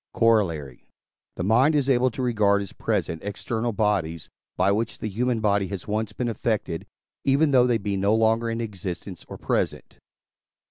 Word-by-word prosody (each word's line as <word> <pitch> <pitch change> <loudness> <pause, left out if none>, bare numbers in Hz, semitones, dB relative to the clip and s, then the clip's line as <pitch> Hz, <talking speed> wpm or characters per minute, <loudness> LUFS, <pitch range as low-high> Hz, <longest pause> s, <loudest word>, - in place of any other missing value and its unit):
Corollary. 85 - +1 0.5
The - - -3
mind 125 - +4
is 140 -3 +2
able 130 -1 +3
to 130 +2 -5
regard 105 -4 +2
as 100 - -10
present 80 - -2
external 110 +3 -2
bodies, 100 -8 -1 0.3
by 95 +2 +3
which 110 +3 -1
the - - -4
human 120 +3 0
body 100 -2 +2
has 95 -1 -6
once 110 0 -1
been 120 +3 -3
affected, 110 -7 -2 0.4
even 140 +2 +3
though 125 -2 +5
they 120 -2 +3
be 100 -1 -2
no 100 +3 +2
longer 115 +1 +2
in 115 0 -2
existence 95 -4 -6
or - - -7
present. - - -2
110 Hz, 170 wpm, -25 LUFS, 100-120 Hz, 0.5 s, though